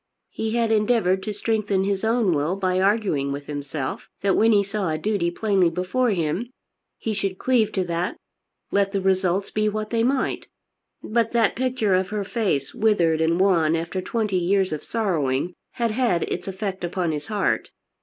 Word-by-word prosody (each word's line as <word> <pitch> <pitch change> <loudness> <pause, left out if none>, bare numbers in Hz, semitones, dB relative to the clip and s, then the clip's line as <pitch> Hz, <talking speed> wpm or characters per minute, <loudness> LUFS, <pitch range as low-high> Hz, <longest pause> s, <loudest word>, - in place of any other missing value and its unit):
He 220 +1 -2
had 230 -1 +1
endeavoured 210 -4 +2
to 210 - -4
strengthen 205 -2 0
his 195 0 -1
own 220 -4 +2
will 155 +4 0
by 185 -1 0
arguing 190 -9 +1
with 140 0 -5
himself 145 -1 -5
that 195 -1 +2
when 225 +1 +4
he 205 -2 +4
saw 200 -2 -2
a 155 - -1
duty 190 0 0
plainly 190 -1 +2
before 185 +9 0
him, 180 +4 -1 0.5
he 220 - -3
should 195 -2 -2
cleave 230 -3 +2
to 190 - +1
that 175 +1 -2 0.5
let 200 0 +1
the 200 - +1
results 190 0 +1
be 215 0 +1
what 215 0 -4
they 230 -1 +2
might. 260 +2 0 0.6
But 230 +1 0
that 230 -3 +3
picture 250 -5 0
of 185 0 +1
her 210 -1 -2
face 195 - -1
withered 170 -7 +2
and 165 +2 +2
wan 170 -5 +3
after 170 +3 -3
twenty 210 0 -1
years 190 +2 +1
of 155 - -5
sorrowing 175 - -1 0.2
had 235 -2 0
had 225 -7 +1
its 180 - -4
effect 190 -1 -4
upon 175 -1 -1
his 150 -1 -4
heart. 210 -2 0
195 Hz, 180 wpm, -23 LUFS, 175-215 Hz, 0.6 s, when